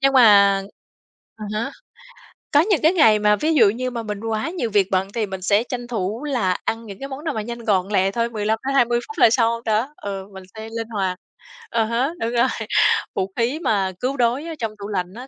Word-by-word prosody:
Nhưng 275 0 +3
mà 200 -6 +6 0.7
à 215 - -8
há, 230 +6 -2 0.8
có 290 - +6
những 390 -1 +1
cái 325 +4 +5
ngày 220 - +5
mà 210 0 +4
ví 310 +10 0
dụ 225 -7 +6
như 250 +4 -3
mà 235 -2 -4
mình 210 -2 -5
quá 225 +5 -2
nhiều 330 -10 -3
việc 200 -2 +3
bận 190 0 +1
thì 230 -2 -1
mình 190 -2 -7
sẽ 205 +4 +2
tranh 245 -1 -6
thủ 220 +1 -3
là 235 -11 0
ăn 230 +1 -2
những 200 -2 -10
cái 275 - -5
món 270 +2 -7
nào 315 - -1
mà 220 - -2
nhanh 235 +2 -6
gọn 195 -5 +1
lẹ 195 -1 +2
thôi, 230 +2 -1
15-20 235 +3 +1
phút 440 - -10
là - - +7
xong 230 0 +1
đó. 225 +7 0
Ừ, 195 -1 -6
mình 190 0 -10
sẽ 220 0 -8
linh 225 -1 -4
hoạt. 190 -4 -2 0.5
À 230 -1 +1
há, 235 +5 0
đúng 230 +1 -1
rồi. 240 +1 +3 0.7
Vũ 190 0 -2
khí 245 +7 0
mà 200 - 0
cứu 265 +2 -2
đói 245 +5 +1
ở 330 -1 -6
trong 225 -2 -2
tủ 200 - -6
lạnh 185 -2 -3
á, 250 +4 -9
225 Hz, 230 wpm, -21 LUFS, 205-250 Hz, 0.8 s, là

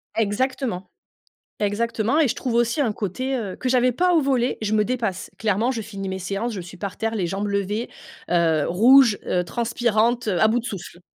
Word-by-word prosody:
Exactement, 225 -2 -1 0.7
exactement 225 +5 0
et 310 - +4
je - - 0
trouve 245 -3 -3
aussi 235 +4 +1
un 230 -6 +1
côté, 255 +7 -3
heu, 200 -6 -4
que 255 - -3
j'avais 250 0 +3
pas 360 +7 +2
au 315 - +4
volley. 255 -2 +1
Je 215 0 -1
me 215 -1 +3
dépasse, 225 -6 -3
clairement, 220 +3 +1
je 225 -3 -4
finis 200 -2 -6
mes 190 0 -3
séances, 200 +5 -3
je 190 - -4
suis 180 +1 -12
par 200 -2 -5
terre, 225 0 -2
les 190 -5 -1
jambes 195 +3 -3
levées, 200 +3 -2 0.4
heu, 165 -3 +2
rouges, 235 +4 +6
heu, 180 0 0
transpirantes, 235 +2 0
heu, 180 -4 0
à 220 - +5
bout 240 +2 +1
de - - -16
souffle. 185 -5 -7
220 Hz, 205 wpm, -23 LUFS, 195-245 Hz, 0.7 s, rouges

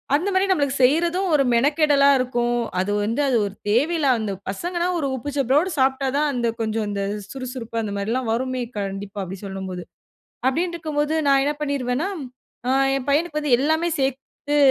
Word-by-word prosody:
அந்த 355 +7 0
மாரி 375 +1 +3
நம்மளுக்கு 285 -6 +1
செய்றதும் 340 +7 +3
ஒரு 280 -2 +4
மெனக்கெடலா 285 +2 +4
இருக்கும், 240 -1 0 0.3
அது 190 +2 0
வந்து 230 +7 0 0.2
ஒரு 200 - -5 0.2
தேவையில்ல. 290 +7 +2
அந்த 215 -2 -2 0.2
பசங்கன்னா 345 - -2
ஒரு 280 - -1
உப்பு 260 +3 -5
சப்பறோடு 275 +7 +2
சாப்ட்டா 265 +1 +2
தான் 300 0 +2
அந்த 240 -1 0
கொஞ்சம் 220 0 -1
அந்த 200 -1 -2 0.3
சுறுசுறுப்பு 255 -3 -6
அந்த 210 - -4
மாரிலாம் 225 +4 -1
வருமே! 255 +2 -1 0.2
கண்டிப்பா, 200 0 -4
அப்டி 190 +1 -6
சொல்லும்போது. 190 -2 -5 0.7
அப்டின்னுருக்கும்போது 315 -1 -1
நான் 275 -1 +5
என்ன 295 +1 0
பண்ணிருவேன்னா, 280 +3 -1 0.6
அ - - +2 0.3
என் 265 0 -4
பையனுக்கு 305 +1 +1
வந்து 290 -4 +3
எல்லாமே 315 +4 +1
சேத்து 275 +2 -2
270 Hz, 155 wpm, -23 LUFS, 230-300 Hz, 0.7 s, நான்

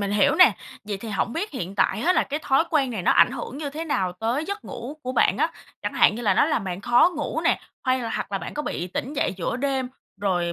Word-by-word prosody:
mình 200 -1 -1
hiểu 205 0 +3
nè. - - +7 0.3
Vậy 205 -1 -3
thì 225 +3 -8
hổng 225 +2 -1
biết 375 - -3
hiện 195 -7 -5
tại 195 0 +1
á, 360 - +4
là - - +3
cái 295 +2 -4
thói 270 +4 +3
quen 275 -5 +2
này 210 -6 -4
nó - - +4
ảnh - - +6
hưởng 265 +1 -6
như 290 -2 -4
thế 315 +3 -5
nào 190 - 0
tới 230 - -2
giấc 400 +4 -5
ngủ 255 +6 -7
của 255 0 -3
bạn - - +3
á? - - +2 0.3
Chẳng - - -2
hạn - - +4
như 240 - -5
là 200 -4 +3
nó - - +5
làm - - 0
bạn 185 0 -4
khó 240 - +5
ngủ 305 +1 -2
nè, 330 - +2 0.2
hay 255 0 +2
là 230 - -3
hoặc - - -4
là 195 - 0
bạn 170 - -7
có 300 - -2
bị 175 - -3
tỉnh 250 +9 -4
dậy 285 - 0
giữa 190 +6 -2
đêm 265 -1 -1 0.3
rồi 175 -4 0
245 Hz, 280 wpm, -24 LUFS, 200-290 Hz, 0.3 s, nè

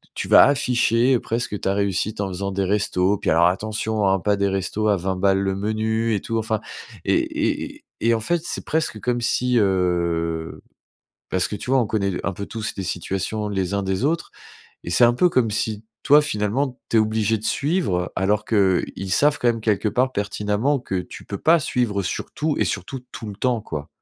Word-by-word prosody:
tu - - -3
vas - - +8
afficher 125 -2 +2
presque 115 -3 -3
ta 95 - 0
réussite 100 +1 -1
en 95 - -2
faisant 100 +2 -3
des 95 0 -1
restos. 100 0 +1
Puis, - - -1
alors, 85 +2 +4
attention, 105 +2 -1
hein, 95 0 +3
pas 105 +3 +1
des 100 0 +1
restos 95 +3 -1
à 105 - +4
20 95 +1 -2
balles, 95 +1 +2
le 95 -1 0
menu 110 +2 0
et 100 - -2
tout. 115 0 -2
Enfin, 110 -1 -1 0.5
et - - +3 0.5
et - - -14 0.2
et 115 +1 +3
en - - -1
fait, 170 +9 0
c'est - - -5
presque 155 -9 -1
comme 120 +1 -1
si, 125 0 +1
heu, 85 -4 0 0.7
parce 95 -1 +1
que, 105 - -4
tu 125 - -6
vois, 135 - +5
on 115 - +1
connaît 100 -3 0
l 90 - -3
un 100 - -1
peu 100 +3 -6
tous 110 -1 -4
les 95 - -4
situations, 95 +4 -3
les 95 -1 -2
uns, 100 - 0
des 95 +5 -1
autres, 165 +3 0 0.5
et 85 - -6
c'est 105 +8 +5
un 120 0 +4
peu 180 +8 +4
comme 120 -9 +1
si, 110 0 -2 0.2
toi, 145 +2 +6
finalement, 125 +1 -1
tu 115 - +1
es - - +6
obligé 110 0 +1
de 105 - -11
suivre, 140 - 0
alors 105 +2 +1
qu'ils 95 -2 0
savent 150 0 +3
quand 120 - -1
même, 115 -1 0
quelque 105 -1 +1
part, 130 +4 +1
pertinemment, 105 +6 -1
que 95 -6 -3
tu - - -11
peux 100 - -6
pas 165 0 +4
suivre, 120 -7 0
heu, - - -2
sur 95 - -4
tout 155 -1 -1
et - - +2
surtout, 100 +7 -3
tout 110 - -7
le 100 - -7
temps, 120 -1 0
quoi. 75 -6 -6
105 Hz, 215 wpm, -22 LUFS, 95-115 Hz, 0.7 s, vas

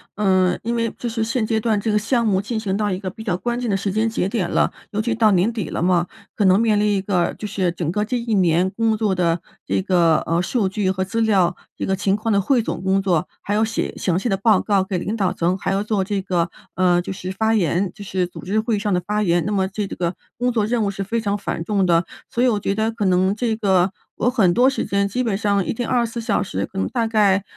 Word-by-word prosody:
嗯， 185 -3 +2
因 235 +2 -1
为 230 -1 0
就 240 - -4
是 225 -1 -1
现 230 0 0
阶 220 0 0
段 215 -2 +1
这 220 +2 -1
个 210 - +3
项 235 +2 +1
目 195 -3 +2
进 220 +2 -3
行 195 -3 -2
到 210 0 0
一 185 - -1
个 190 -2 -4
比 220 +4 -10
较 180 -5 -1
关 240 +4 -2
键 245 - -2
的 195 - +1
时 200 +1 -2
间 220 +3 +1
节 205 -4 -1
点 195 -4 -1
了。 - - +2 0.2
尤 210 +1 -1
其 235 +1 -1
到 215 -2 +4
年 190 +5 +3
底 215 -9 -4
了 - - -3
嘛， 175 -1 +2 0.3
可 205 - +1
能 190 +2 +5
面 215 -2 +3
临 210 - +2
一 190 - 0
个 185 -3 0
就 210 - -5
是 185 -3 0
整 165 -2 -3
个 210 +3 0
这 250 +3 -1
一 235 -2 -2
年 180 -1 +3
工 225 +1 +1
作 210 -3 +1
的 170 -1 +1 0.2
这 - - 0
个， 175 -4 +3
呃， 165 +1 +1
数 200 +2 0
据 190 0 -1
和 190 0 -1
资 225 +4 -2
料， 195 -6 +3 0.2
这 - - -3
个 190 - +1
情 195 0 +1
况 220 +1 -2
的 200 - +3
汇 245 +4 +2
总 - - -4
工 190 +1 +2
作， 175 -5 +1
还 205 - -3
要 215 +1 +2
写 225 0 -2
详 180 -2 0
细 220 - -1
的 195 -3 +1
报 210 -1 +4
告 200 -3 +1
给 190 -1 -3
领 205 +5 -3
导 190 -4 +1
层， 175 +2 0
还 195 - -2
要 195 +1 0
做 210 -3 0
这 200 0 -2
个， 175 -3 0 0.3
呃， 180 -1 +3
就 185 - -5
是 185 0 -6
发 220 +3 +1
言， 185 -2 +1
就 205 - -10
是 185 -2 -1
组 - - -11
织 210 +4 0
会 225 0 0
议 205 - -1
上 210 0 -1
的 180 - +2
发 210 +1 0
言。 170 -2 +2
那 210 - -1
么 190 -2 +1
这 205 +1 -3
个 175 -1 -3 0.2
工 245 +1 +1
作 220 -3 +1
任 230 0 0
务 200 - 0
是 195 0 -4
非 225 +3 -2
常 205 -1 -1
繁 180 -4 -4
重 200 +1 +1
的， 170 -1 +3 0.2
所 240 - 0
以 - - +5
我 215 -4 +2
觉 195 - -1
得 220 +2 0
可 220 -3 -3
能 185 +1 +2
这 225 0 0
个 190 -4 +2 0.2
我 245 - +1
很 195 -8 +3
多 245 +7 +4
时 270 - 0
间 200 0 0
基 245 +6 -2
本 210 -5 0
上 200 -2 +1
一 - - -2
天 240 0 -3
24 235 -2 0
小 220 -3 0
时， 195 - -2
可 190 - -7
能 - - 0
大 235 -3 0
概 205 -3 +3
200 Hz, 300 characters per minute, -21 LUFS, 185-220 Hz, 0.3 s, 能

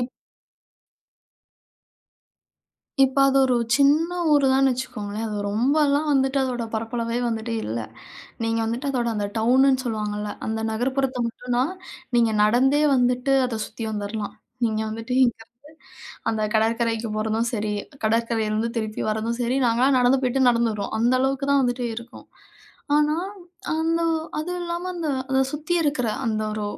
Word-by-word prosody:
இப் 245 +1 -3 2.9
இப்ப 265 +1 0
அது 275 0 +3
ஒரு 255 -1 +2 0.2
சின்ன 305 +5 +3 0.2
ஊருதான்னு 270 -2 +4
வச்சுக்கோங்களேன். 220 -4 -4
அது 210 -1 -4
ரொம்பலாம் 285 +7 +2
வந்துட்டு 270 0 +2
அதோட 250 -2 -2
பரப்பளவே 230 +1 -2
வந்துட்டு 230 0 -3
இல்ல. 115 +2 -3 0.6
நீங்க 225 0 0
வந்துட்டு 240 +5 -2
அதோட 245 -3 -1
அந்த 205 -1 -1
டவுனுன்னு 260 +3 +3
சொல்லுவாங்கல்ல, 210 -2 -3 0.2
அந்த 220 0 -2
நகர்ப்புறத்தை 260 +3 -1
மட்டும் 245 +1 -4
தான் 270 +9 +1 0.4
நீங்க 230 -2 +3
நடந்தே 265 +7 +3
வந்துட்டு, 250 +1 +2
அதை 230 -3 -3
சுத்தி 225 +1 -7
வந்துறலாம். 205 0 -4 0.3
நீங்க 220 -1 0
வந்துட்டு 225 +3 -5
இங்கருந்து 230 -2 -4 0.8
அந்த 220 -1 -1
கடற்கரைக்கு 225 +1 +1
போறதும் 220 +2 0
சரி, 210 -2 -1 0.3
கடற்கரையிலிருந்து 225 0 0
திருப்பி 215 -1 -3
வரதும் 225 +2 -2
சரி, 245 +2 0
நாங்கல்லாம் 255 +4 +3
நடந்து 250 +2 +4
போய்ட்டு 255 0 +3
நடந்து 235 -1 +2
வருவோம். 205 0 -4
அந்த 240 +3 +3
அளவுக்கு 270 +1 0
தான் 280 -1 +4
வந்துட்டு 245 0 -1
இருக்கும். 235 +2 -10 0.7
ஆனா 300 0 +3 0.6
அந்த 325 +1 0 0.4
அதுவும் 355 +4 -3
இல்லாம, 345 +1 -4
அந்த 335 -3 -3 0.2
அதை 265 0 +3
சுத்தி 305 +4 -2
இருக்கிற 285 -6 0 0.2
அந்த 215 -2 0
ஒரு 215 -1 -3
240 Hz, 135 wpm, -23 LUFS, 220-270 Hz, 2.9 s, ஊருதான்னு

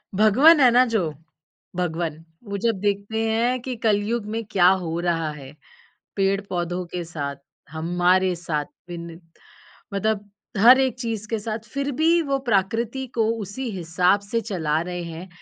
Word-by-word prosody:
भगवन 260 - +6
है 255 -3 +7
ना 250 +1 +5
जो, 190 -10 -1 0.6
भगवन, 165 -2 -2 0.2
वो 200 -3 -4
जब 225 -2 0
देखते 205 +2 -1
हैं, 240 +3 +1
कि 255 +1 -4
कलयुग 215 +2 +1
में 230 - -2
क्या 180 -2 +5 0.2
हो 165 +1 -3
रहा 165 -3 0
है। 140 -2 -10 0.6
पेड़-पौधों 185 -3 -1
के 180 -1 -2
साथ, 145 -4 -4 0.4
हमारे 175 +3 +2
साथ, 155 -3 -3 0.2
विनत 170 0 -8 0.7
मतलब 205 0 -1 0.3
हर 250 +5 +8
एक 260 -3 +1
चीज़ 225 -3 -4
के 225 - 0
साथ, 215 +1 -4
फ़िर 280 +1 -1
भी 325 +5 +3
वो 275 0 +1
प्राकृति 225 +6 0
को 225 - +2 0.2
उसी 240 +6 -5
हिसाब 180 +1 +1
से 220 +3 -2
चला 160 -8 -1
रहे 175 0 -4
हैं, 170 +2 -7
200 Hz, 150 wpm, -23 LUFS, 175-230 Hz, 0.7 s, हर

